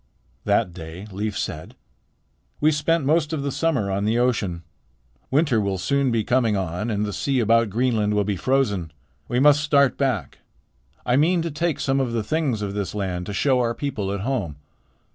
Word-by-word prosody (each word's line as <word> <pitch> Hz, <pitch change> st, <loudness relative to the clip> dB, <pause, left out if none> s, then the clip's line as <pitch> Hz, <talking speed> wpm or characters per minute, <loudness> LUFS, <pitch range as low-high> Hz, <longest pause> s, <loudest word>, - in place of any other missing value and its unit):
That 90 Hz, -, +1 dB
day 85 Hz, +2 st, -8 dB
Leif 105 Hz, +2 st, -3 dB
said: 80 Hz, -1 st, -5 dB, 0.8 s
"We 155 Hz, +1 st, +4 dB
spent 155 Hz, +1 st, +1 dB
most 155 Hz, +1 st, +2 dB
of 145 Hz, -3 st, -2 dB
the 140 Hz, -, -2 dB
summer 135 Hz, -11 st, 0 dB
on 100 Hz, +1 st, -1 dB
the 110 Hz, +3 st, +1 dB
ocean. 105 Hz, -9 st, 0 dB, 0.7 s
Winter 135 Hz, -5 st, +2 dB
will 100 Hz, -1 st, -1 dB
soon 135 Hz, +9 st, +1 dB
be 115 Hz, -2 st, +1 dB
coming 115 Hz, -3 st, +2 dB
on 95 Hz, +4 st, -3 dB
and 105 Hz, -1 st, 0 dB
the 105 Hz, -, -4 dB
sea 135 Hz, +4 st, 0 dB
about 115 Hz, 0 st, +3 dB
Greenland 110 Hz, -2 st, +1 dB
will 105 Hz, -, +2 dB
be 100 Hz, 0 st, -1 dB
frozen. 105 Hz, -, 0 dB, 0.4 s
We 120 Hz, -, 0 dB
must 145 Hz, +1 st, +5 dB
start 140 Hz, -3 st, +3 dB
back. 125 Hz, -, -1 dB, 0.7 s
I 125 Hz, -, +2 dB
mean 165 Hz, +3 st, +3 dB
to 165 Hz, -, -3 dB
take 165 Hz, +1 st, -1 dB
some 135 Hz, 0 st, +1 dB
of 125 Hz, -3 st, -1 dB
the 115 Hz, -2 st, -1 dB
things 135 Hz, -4 st, -1 dB
of 100 Hz, -1 st, -3 dB
this 100 Hz, 0 st, -3 dB
land 90 Hz, -3 st, -3 dB
to 105 Hz, -, -4 dB
show 130 Hz, +5 st, +2 dB
to -, -, +2 dB
our 115 Hz, -1 st, 0 dB
people 115 Hz, -9 st, -3 dB
at 100 Hz, -1 st, -3 dB
home. 105 Hz, -, -2 dB
115 Hz, 195 wpm, -23 LUFS, 100-140 Hz, 0.8 s, must